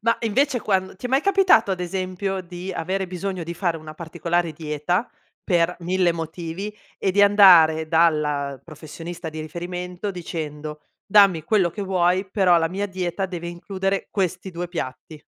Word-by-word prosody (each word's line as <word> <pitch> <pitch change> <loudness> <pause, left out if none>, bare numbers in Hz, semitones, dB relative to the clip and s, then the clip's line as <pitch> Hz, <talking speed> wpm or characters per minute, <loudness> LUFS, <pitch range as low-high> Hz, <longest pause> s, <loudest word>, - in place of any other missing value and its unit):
Ma 230 +1 +2
invece 245 +3 +1
quando 190 -2 -1
ti 250 - -5
è - - -8
mai 265 +2 +3
capitato 375 - +4
ad 185 -1 -2
esempio 185 +1 -3
di 180 +1 -7
avere 190 +3 -2
bisogno 185 0 -4
di 170 +1 -5
fare 175 -2 -1
una 155 -1 -10
particolare 170 +1 -2
dieta, 155 +7 -2 0.4
per 175 -1 +2
1000 180 0 +1
motivi 170 +5 -5 0.2
e 190 - +1
di 200 +2 +2
andare 175 -6 +7
dalla 150 -4 +1
professionista 165 +2 -8
di 155 0 -6
riferimento 180 +4 -5
dicendo: 155 -4 -6 0.3
"Dammi 195 -5 +5
quello 190 0 +2
che 205 - -5
vuoi, 185 0 +1
però 185 -4 +4
la 165 0 +1
mia 200 +3 -2
dieta 185 0 -3
deve 175 -2 -6
includere 195 +2 -3
questi 185 -1 -2
2 175 0 -5
piatti." 155 -1 -6
180 Hz, 160 wpm, -23 LUFS, 165-195 Hz, 0.4 s, andare